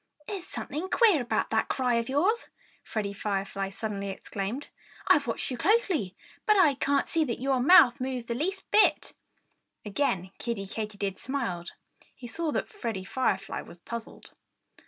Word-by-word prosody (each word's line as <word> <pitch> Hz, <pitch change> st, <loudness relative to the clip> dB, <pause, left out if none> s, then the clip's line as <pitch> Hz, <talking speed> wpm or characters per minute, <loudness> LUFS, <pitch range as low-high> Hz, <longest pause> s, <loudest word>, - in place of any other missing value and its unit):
"There's 375 Hz, 0 st, -5 dB
something 335 Hz, +6 st, -4 dB
queer 420 Hz, -, +5 dB
about 240 Hz, -, -1 dB
that -, -, +2 dB
cry 250 Hz, -2 st, +1 dB
of 230 Hz, -, -4 dB
yours!" 370 Hz, -, +1 dB, 0.3 s
Freddie 205 Hz, -2 st, -3 dB
Firefly 195 Hz, -1 st, -2 dB
suddenly 200 Hz, -1 st, -4 dB
exclaimed. 200 Hz, +6 st, -5 dB, 0.4 s
"I'm -, -, +5 dB
watching -, -, -2 dB
you 245 Hz, -, -6 dB
closely; 350 Hz, -, +2 dB, 0.3 s
but 425 Hz, -1 st, +5 dB
I 320 Hz, -7 st, +6 dB
can't 275 Hz, +1 st, +1 dB
see 325 Hz, -1 st, +1 dB
that 235 Hz, -5 st, -3 dB
your 265 Hz, 0 st, +1 dB
mouth 250 Hz, -3 st, +7 dB
moves 255 Hz, -2 st, -3 dB
the 235 Hz, -, -2 dB
least 380 Hz, +10 st, -2 dB
bit." 425 Hz, -, +4 dB, 0.7 s
Again 195 Hz, -5 st, -1 dB
Kiddie 230 Hz, -5 st, -3 dB
Katydid 200 Hz, -1 st, -4 dB
smiled. 230 Hz, -10 st, -3 dB, 0.4 s
He 255 Hz, -, -11 dB
saw 310 Hz, +7 st, -2 dB
that -, -, -1 dB
Freddie 230 Hz, -, -4 dB
Firefly 195 Hz, -4 st, -1 dB
was -, -, -13 dB
puzzled. 230 Hz, +6 st, -8 dB
245 Hz, 155 wpm, -28 LUFS, 200-300 Hz, 0.7 s, mouth